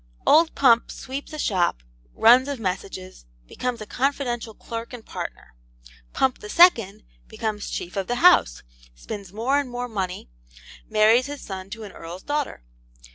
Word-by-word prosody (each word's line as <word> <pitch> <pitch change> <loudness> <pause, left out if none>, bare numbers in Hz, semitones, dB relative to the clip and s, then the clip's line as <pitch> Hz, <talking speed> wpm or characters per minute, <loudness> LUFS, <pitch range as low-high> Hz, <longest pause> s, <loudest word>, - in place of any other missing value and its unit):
Old 320 +2 +5
Pump 240 -4 +4
sweeps 270 +2 -7
a 305 - -6
shop, 175 - 0 0.3
runs 250 +4 +6
of 280 -3 -4
messages, 185 - -5 0.2
becomes 245 - -4
a - - -5
confidential 245 -3 -2
clerk 230 +1 -7
and 240 -3 -9
partner. - - -7 0.6
Pump 265 -1 +1
the 210 - -9
Second 230 - +4 0.2
becomes 210 - -4
chief 175 - -5
of 195 -1 -2
the 245 - -1
house, 245 - +4 0.3
spins 180 - -8
more 240 +7 +1
and 280 -3 -4
more 245 0 -4
money, 190 - -4 0.6
marries 220 +4 +4
his 290 -1 -7
son 190 -1 -7
to 225 +1 -8
an 205 - -9
Earl's 170 +2 -9
daughter. 290 - -3
230 Hz, 155 wpm, -24 LUFS, 195-260 Hz, 0.6 s, runs